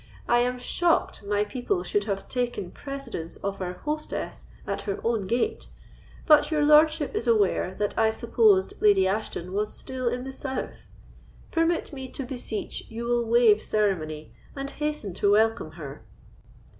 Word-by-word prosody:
I 240 Hz, -, +4 dB
am 250 Hz, +1 st, +1 dB
shocked 335 Hz, -, +1 dB
my 205 Hz, 0 st, +1 dB
people 210 Hz, -4 st, -2 dB
should 205 Hz, +3 st, 0 dB
have 195 Hz, -2 st, -3 dB
taken 245 Hz, -7 st, -2 dB
precedence 275 Hz, -, -6 dB
of 195 Hz, 0 st, -3 dB
our 180 Hz, -1 st, -2 dB
hostess 305 Hz, +1 st, -4 dB, 0.2 s
at -, -, -3 dB
her 200 Hz, -2 st, -3 dB
own 225 Hz, -4 st, 0 dB
gate; 245 Hz, -, -1 dB, 0.6 s
but 300 Hz, -2 st, +6 dB
your 300 Hz, -2 st, +2 dB
lordship 305 Hz, 0 st, +5 dB
is 240 Hz, -, -2 dB
aware 200 Hz, -4 st, +2 dB
that 205 Hz, 0 st, -2 dB
I 220 Hz, 0 st, +5 dB
supposed 220 Hz, -4 st, +2 dB
Lady 200 Hz, -3 st, +5 dB
Ashton 190 Hz, -3 st, -3 dB
was 210 Hz, +1 st, -1 dB
still 260 Hz, -1 st, -4 dB
in 245 Hz, +1 st, -1 dB
the 265 Hz, 0 st, -6 dB
south. 265 Hz, 0 st, -5 dB, 0.6 s
Permit 330 Hz, -1 st, +1 dB
me 265 Hz, -2 st, -6 dB
to 270 Hz, -, -4 dB
beseech 245 Hz, -4 st, -5 dB
you 230 Hz, +1 st, -5 dB
will 240 Hz, 0 st, +1 dB
waive 225 Hz, -2 st, +5 dB
ceremony, 160 Hz, -8 st, -1 dB, 0.2 s
and 275 Hz, 0 st, -5 dB
hasten 300 Hz, -11 st, -3 dB
to 200 Hz, +3 st, +2 dB
welcome 220 Hz, -6 st, +2 dB
her." 145 Hz, -6 st, -9 dB
230 Hz, 155 wpm, -26 LUFS, 200-265 Hz, 0.6 s, but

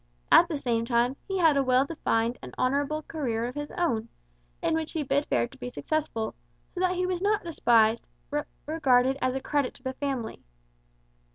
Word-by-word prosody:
At -, -, +8 dB
the 310 Hz, -, -2 dB
same 235 Hz, -4 st, 0 dB
time, 240 Hz, +2 st, +1 dB
he 385 Hz, -, -1 dB
had 325 Hz, -5 st, +5 dB
a 275 Hz, -, +3 dB
well 255 Hz, +1 st, +3 dB
defined 235 Hz, -6 st, -1 dB
and -, -, -10 dB
honourable 285 Hz, +4 st, 0 dB
career 240 Hz, -9 st, -2 dB
of 245 Hz, -, -4 dB
his 290 Hz, +1 st, -5 dB
own, 235 Hz, -11 st, 0 dB, 0.5 s
in -, -, +2 dB
which 320 Hz, -1 st, -2 dB
he 320 Hz, -3 st, -1 dB
bid 280 Hz, +1 st, 0 dB
fair 120 Hz, 0 st, +1 dB
to -, -, -17 dB
be 125 Hz, -, -5 dB
successful; 225 Hz, -, -2 dB, 0.4 s
so 360 Hz, -, -5 dB
that 365 Hz, 0 st, +2 dB
he 365 Hz, 0 st, 0 dB
was 365 Hz, -1 st, -2 dB
not 415 Hz, +1 st, +1 dB
despised, 235 Hz, -9 st, +3 dB, 0.2 s
but 295 Hz, 0 st, -1 dB, 0.2 s
regarded 270 Hz, -4 st, +3 dB
as 255 Hz, 0 st, +1 dB
a -, -, 0 dB
credit 285 Hz, -1 st, -1 dB
to -, -, -16 dB
the 260 Hz, -1 st, -3 dB
family. 265 Hz, -5 st, -4 dB
275 Hz, 195 wpm, -27 LUFS, 235-310 Hz, 0.5 s, At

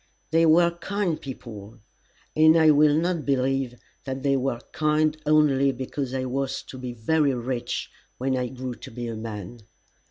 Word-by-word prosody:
They 165 Hz, +1 st, +4 dB
were 170 Hz, +2 st, +5 dB
kind 190 Hz, -3 st, -2 dB
people, 115 Hz, -4 st, -9 dB, 0.6 s
and 155 Hz, +1 st, +6 dB
I 160 Hz, -1 st, +6 dB
will 150 Hz, 0 st, +5 dB
not 170 Hz, -1 st, 0 dB
believe 135 Hz, -2 st, 0 dB, 0.3 s
that 135 Hz, -1 st, -5 dB
they 140 Hz, -1 st, +2 dB
were 130 Hz, -2 st, -1 dB
kind 155 Hz, 0 st, +1 dB
only 145 Hz, -3 st, +4 dB
because 130 Hz, 0 st, -4 dB
I 130 Hz, -1 st, -1 dB
was 135 Hz, +1 st, -2 dB
to 130 Hz, -, -8 dB
be 125 Hz, -1 st, -5 dB
very 140 Hz, +4 st, +1 dB
rich 120 Hz, 0 st, -3 dB, 0.3 s
when 130 Hz, +1 st, 0 dB
I 125 Hz, -1 st, -1 dB
grew 130 Hz, 0 st, -6 dB
to -, -, -11 dB
be 120 Hz, +1 st, -6 dB
a 115 Hz, -, -4 dB
man. 110 Hz, 0 st, -7 dB
135 Hz, 165 wpm, -25 LUFS, 125-155 Hz, 0.6 s, and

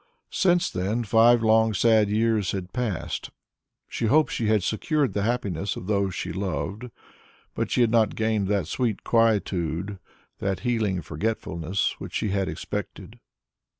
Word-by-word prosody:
Since 175 Hz, -2 st, +2 dB
then 100 Hz, +6 st, -1 dB
five 115 Hz, +2 st, +5 dB
long 110 Hz, -1 st, +4 dB
sad 110 Hz, 0 st, +4 dB
years 110 Hz, -2 st, +1 dB
had 95 Hz, -2 st, -5 dB
passed. 120 Hz, -9 st, -3 dB, 0.6 s
She 115 Hz, -, -2 dB
hoped 155 Hz, +7 st, +3 dB
she 115 Hz, -, -1 dB
had 105 Hz, -3 st, +2 dB
secured 140 Hz, -, 0 dB
the 100 Hz, -, -1 dB
happiness 100 Hz, -5 st, -1 dB
of -, -, -7 dB
those 100 Hz, -2 st, 0 dB
she 90 Hz, -, -4 dB
loved, 95 Hz, -, -4 dB, 0.6 s
but -, -, -2 dB
she -, -, +1 dB
had 115 Hz, -2 st, +3 dB
not 110 Hz, -3 st, +3 dB
gained 110 Hz, -3 st, 0 dB
that 100 Hz, -4 st, 0 dB
sweet 115 Hz, -, -2 dB
quietude, 100 Hz, -5 st, 0 dB, 0.4 s
that 95 Hz, -1 st, -2 dB
healing 110 Hz, -7 st, 0 dB
forgetfulness 90 Hz, +1 st, -2 dB
which -, -, -8 dB
she 105 Hz, -, 0 dB
had 95 Hz, -2 st, 0 dB
expected. 80 Hz, -, -6 dB
105 Hz, 150 wpm, -25 LUFS, 95-115 Hz, 0.6 s, five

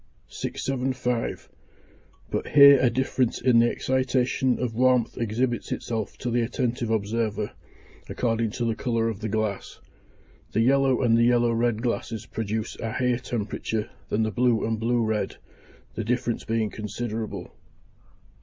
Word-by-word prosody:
675. 125 Hz, -2 st, -2 dB, 0.8 s
But -, -, -2 dB
here 140 Hz, -1 st, +8 dB
a 125 Hz, -, +4 dB
difference 130 Hz, -1 st, 0 dB
in 120 Hz, -2 st, +4 dB
the 120 Hz, 0 st, +4 dB
excitation 130 Hz, 0 st, +1 dB
of 125 Hz, -3 st, -2 dB
warmth 125 Hz, 0 st, +2 dB
exhibits 120 Hz, +2 st, -1 dB
itself 110 Hz, -3 st, -3 dB
to 120 Hz, -, -3 dB
the 120 Hz, +1 st, +2 dB
attentive 120 Hz, 0 st, -1 dB
observer, 110 Hz, -1 st, -1 dB, 0.6 s
according 115 Hz, -2 st, 0 dB
to 120 Hz, -2 st, -2 dB
the 115 Hz, -, +1 dB
colour 115 Hz, 0 st, 0 dB
of 110 Hz, -3 st, -5 dB
the 110 Hz, 0 st, -3 dB
glass. 110 Hz, -1 st, -3 dB, 0.7 s
The 110 Hz, -, +2 dB
yellow 135 Hz, +1 st, +3 dB
and 115 Hz, -2 st, +4 dB
the 115 Hz, 0 st, +4 dB
yellow 120 Hz, -1 st, +3 dB
red 115 Hz, -1 st, 0 dB
glasses 115 Hz, -2 st, -2 dB
produce 110 Hz, -1 st, -3 dB
a 115 Hz, -1 st, -3 dB
higher 125 Hz, -1 st, +1 dB
temperature 110 Hz, -2 st, -3 dB, 0.2 s
than 110 Hz, -, +1 dB
the 110 Hz, -, -1 dB
blue 120 Hz, -2 st, +2 dB
and 115 Hz, -1 st, -1 dB
blue 115 Hz, +1 st, +1 dB
red, 110 Hz, -1 st, -2 dB, 0.6 s
the 115 Hz, -, -3 dB
difference 120 Hz, +1 st, -1 dB
being 115 Hz, -2 st, 0 dB
considerable. 110 Hz, +1 st, -5 dB
115 Hz, 145 wpm, -25 LUFS, 110-125 Hz, 0.8 s, here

